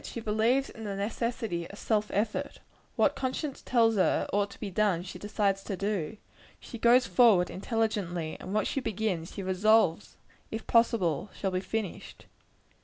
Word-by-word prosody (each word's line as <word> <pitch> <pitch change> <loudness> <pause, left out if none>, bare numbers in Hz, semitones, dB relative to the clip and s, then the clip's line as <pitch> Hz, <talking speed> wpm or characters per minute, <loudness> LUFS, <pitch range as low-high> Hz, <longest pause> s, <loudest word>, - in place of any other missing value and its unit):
She - - -6
believes 225 +5 +1
in 225 - -10
the 200 -1 -3
necessity 215 -3 -3
of 200 - -10
self 210 -1 0
effort. 210 +2 -1 0.4
What - - +3
conscience 270 +2 -3
tells 225 -3 +3
her 185 - +2
ought 200 0 +1
to - - -14
be 205 -3 -5
done, 190 -3 +1
she 180 - -8
decides 200 -2 0
to 195 - -3
do. 200 -2 -2 0.4
She 235 - -9
goes 240 +3 +5
forward 215 -8 +4
intelligently 195 -6 -2
and 185 - -7
what 215 +1 +1
she - - -1
begins, 210 -8 -2
she 195 - -4
resolves, 190 -1 +2 0.3
if 220 0 -5
possible, 205 -7 +2
shall 195 - -1
be 185 - 0
finished. 215 -1 -5
210 Hz, 165 wpm, -29 LUFS, 190-225 Hz, 0.4 s, goes